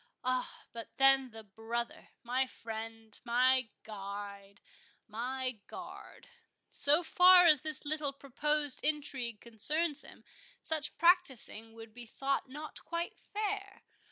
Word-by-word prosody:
Ah, 255 0 -3
but 230 -1 -10
then 270 -1 +5
the 225 -1 -11
brother—my 235 +4 -4
friend—my 225 +3 -2
guide—my 205 +4 -7
guard—So 355 -9 -2
far 360 +1 +7
as 305 -5 +5
this 310 -1 +3
little 300 -1 -1
proposed 285 +1 -2
intrigue 265 -7 +2
concerns 295 +7 -1
him, - - -16 0.4
such 305 -2 -5
practising 270 - +2
would 225 -1 -12
be 240 0 -10
thought 275 +3 -2
not 300 +3 -9
quite 335 0 -4
fair. 400 -2 -5
260 Hz, 100 wpm, -32 LUFS, 225-305 Hz, 0.4 s, far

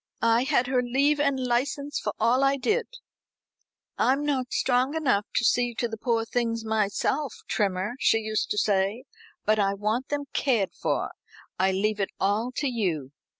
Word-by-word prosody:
I 230 +2 +4
had 275 -3 +2
her 255 0 +1
leave 275 +4 +2
and 280 -2 +1
license 265 +4 -1
for - - -2
all 240 +4 +3
I 275 0 +3
did. 435 - 0 1.1
'I'm 275 +3 +2
not 260 -4 -1
strong 255 +3 +1
enough 250 -10 +1
to 240 - +2
see 245 0 +2
to 235 - -1
the 225 - -5
poor 225 0 0
things 230 -1 -1
myself, 220 +6 0
Trimmer,' 195 +1 0
she 225 - +4
used 215 -1 -2
to - - -1
say, 205 +3 +1 0.4
'but 215 +1 +3
I 200 -1 +2
want 215 +6 -1
them 290 0 -2
cared 230 -9 +1
for. - - -2 0.5
I 190 +1 +3
leave 210 +3 0
it 195 - 0
all 210 +5 +1
to 290 - 0
you.'" 175 - -2
240 Hz, 170 wpm, -26 LUFS, 210-270 Hz, 1.1 s, I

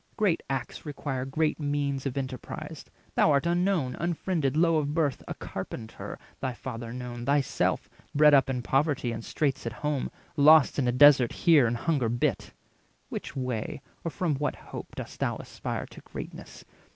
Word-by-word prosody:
Great 200 -6 +2
acts 135 -2 -3
require 135 -3 -3
great 150 +4 0
means 145 -2 -1
of 135 - -4
enterprise; 130 -1 -5 0.3
Thou - - +4
art 140 +2 +3
unknown, 175 -6 +1
unfriended, 165 -4 0
low 165 -1 +4
of 150 -1 -1
birth, 145 -6 +1
A - - -4
carpenter 110 -2 -7 0.2
thy 130 - -2
father 115 -2 -6
known, 120 -1 -6
thyself 140 -1 +1 0.3
Bred 150 0 +7
up 135 -1 +5
in 125 -2 -2
poverty 135 -2 +1
and 115 0 -5
straits 135 -3 -1
at 115 - -3
home, 150 -3 0 0.3
Lost 155 0 +6
in 130 - +1
a - - +3
desert 130 -1 +7
here 155 -8 +5
and 120 +1 -1
hunger 135 -3 +1
bit. 120 +1 0 0.6
Which - - -6
way, 125 -4 -3 0.2
or 165 - -1
from 165 -1 -1
what 145 -1 -1
hope, - - -9
dost - - -7
thou - - 0
aspire - - -5
To - - -11
greatness? - - -9
140 Hz, 165 wpm, -28 LUFS, 125-155 Hz, 0.6 s, Bred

